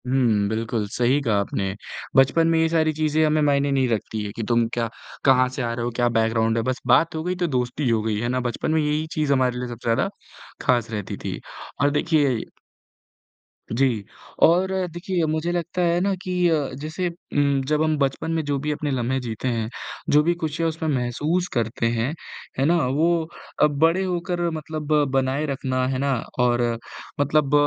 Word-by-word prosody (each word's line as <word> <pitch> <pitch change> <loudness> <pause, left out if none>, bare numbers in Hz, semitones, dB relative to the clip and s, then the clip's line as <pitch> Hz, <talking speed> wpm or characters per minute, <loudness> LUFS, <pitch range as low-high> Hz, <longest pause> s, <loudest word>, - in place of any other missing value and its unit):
हुँ, 120 -6 +2
बिल्कुल, 110 -1 -2
सही 125 +5 +2
कहा 115 -6 +1
आपने। 95 -1 -2 0.4
बचपन 140 +5 +5
में 165 0 +3
ये 160 0 +3
सारी 160 -1 +2
चीज़ें 155 0 +1
हमें 155 0 +2
मायने 140 -1 +2
नहीं 135 -2 +2
रखती 110 -1 -2
है 100 - -4
कि 115 - -3
तुम 120 -1 +3
क्या 115 -1 -1 0.4
कहाँ 130 -2 +5
से 130 +1 -5
आ 120 -1 -1
रहे 120 0 -3
हो, 120 - -2
क्या 120 -1 +2
बैकग्राउंड 115 0 +1
है, 115 - +1
बस 130 +1 -2
बात 145 +7 +4
हो 160 - -3
गई, 180 +2 -1
तो 180 -1 0
दोस्ती 125 -1 -1
हो 115 -2 +2
गई, 110 -1 -1
है 120 - -1
ना? 130 +1 0
बचपन 120 - -2
में 160 - +3
यही 150 +1 0
चीज़ 150 -2 +1
हमारे 130 -2 +1
लिए 125 - -3
सबसे 120 0 -8
ज़्यादा 130 +10 +1 0.5
खास 120 -4 +2
रहती 105 -3 -4
थी। - - -3 0.4
और 140 - +4
देखिए 145 -4 +2 1.3
जी, 120 -3 +1 0.4
और 180 +3 +5 0.2
देखिए 175 0 -1
मुझे 155 +2 -1
लगता 175 +1 -2
है 170 0 +2
ना 195 +1 +1
कि 185 0 -4 0.2
अ, 150 -4 +1
जैसे 155 +6 -3
उम, 145 -5 0
जब 155 +1 +2
हम 155 -1 +1
बचपन 140 +3 -1
में 165 -1 0
जो 145 -1 0
भी 150 +2 -2
अपने 150 -1 -2
लम्हें 130 0 0
जीते 115 +1 -4
हैं, 115 -3 -1 0.4
जो 150 - +6
भी 170 +2 +2
खुशियाँ 165 0 -1
उसमें 160 0 -4
महसूस 150 +7 0
करते 115 -1 0
हैं, 120 +5 -1 0.5
है 135 - +3
ना? 170 +4 +4
वो 160 +4 +1 0.4
अब 150 -1 +3
बड़े 165 +4 +4
होकर 180 -1 -2
मतलब 155 -1 -5 0.2
बनाए 135 +2 +1
रखना, 130 -2 -1
है 130 0 -1
ना, 140 +1 +1 0.3
और 120 -1 +3 0.6
मतलब 145 0 +2
140 Hz, 195 wpm, -23 LUFS, 120-160 Hz, 1.3 s, जो